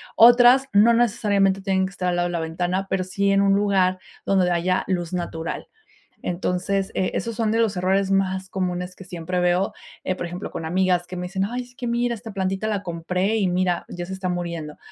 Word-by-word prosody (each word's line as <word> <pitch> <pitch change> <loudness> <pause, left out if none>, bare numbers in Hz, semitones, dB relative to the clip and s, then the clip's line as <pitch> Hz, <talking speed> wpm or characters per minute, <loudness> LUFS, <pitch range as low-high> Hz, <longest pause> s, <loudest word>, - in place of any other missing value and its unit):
otras 245 +3 +7
no 220 +4 +6
necesariamente 205 -4 +2
tienen 190 -1 +1
que 190 - -6
estar 180 -1 -3
al 175 - 0
lado 175 0 +1
de - - -5
la 170 - -1
ventana, 175 +4 -2
pero 190 -1 0
sí 200 +2 0
en 195 - +4
un 195 0 +4
lugar 190 -2 +2 0.3
donde 185 -2 +2
haya 180 +2 +1
luz 175 -3 -2
natural. 165 -2 -4 0.6
Entonces, 185 +2 -1
eh, 185 - 0
esos 230 -1 -2
son 225 -1 0
de 225 - +1
los 220 -3 +2
errores 190 +2 +1
más 190 -1 0
comunes 180 -1 -3
que - - -11
siempre 180 0 -3
veo, 180 +2 +1 0.3
eh, 185 - 0
por 175 -1 -5
ejemplo, 175 +3 -6
con 160 - -5
amigas 180 +1 +1
que 180 - -7
me 180 - -4
dicen: 190 +1 -1
"Ay, 245 +4 -3
es 245 0 -18
que 245 -2 -5
mira, 240 0 0
esta 225 -1 -8
plantita 195 +1 -2
la 205 -2 -1
compré 180 +4 -1
y 200 - +1
mira, 180 -1 0
ya 175 0 -5
se 190 - -7
está 190 -1 -3
muriendo". 170 -4 -4
190 Hz, 215 wpm, -23 LUFS, 180-200 Hz, 0.6 s, otras